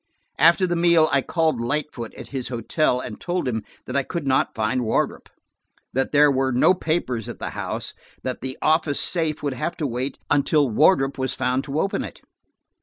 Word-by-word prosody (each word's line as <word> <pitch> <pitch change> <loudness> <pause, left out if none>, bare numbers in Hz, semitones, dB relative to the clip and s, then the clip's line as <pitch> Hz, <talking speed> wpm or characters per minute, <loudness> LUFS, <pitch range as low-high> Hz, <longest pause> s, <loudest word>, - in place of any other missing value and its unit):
After 170 +3 +6
the 175 -1 0
meal, 170 -2 +4
I 140 0 +3
called 160 -4 0
Lightfoot 125 -2 -3
at - - -10
his 130 -3 -3
hotel, 125 +3 0
and 115 -4 -7
told 175 -4 -2
him 110 -3 -1 0.2
that 125 - -6
I 140 - +3
could 170 +2 -5
not 130 -1 +1
find 120 +3 0
Wardrop; 110 - -1 0.6
that 135 +1 0
there 145 0 +6
were 130 0 +1
no 125 +8 +5
papers 155 - -2
at - - -6
the - - -5
house, - - -4
and - - -28
that 130 -1 -3
the 130 +1 -5
office 155 -2 +2
safe 160 -4 0
would 140 -2 -1
have 170 +7 -3
to 155 - -2
wait 130 +1 -3
until 145 0 +3
Wardrop 135 - +3
was 130 0 -1
found 130 +2 0
to 145 +2 -2
open 195 - 0
it. - - -9
140 Hz, 195 wpm, -23 LUFS, 125-160 Hz, 0.6 s, After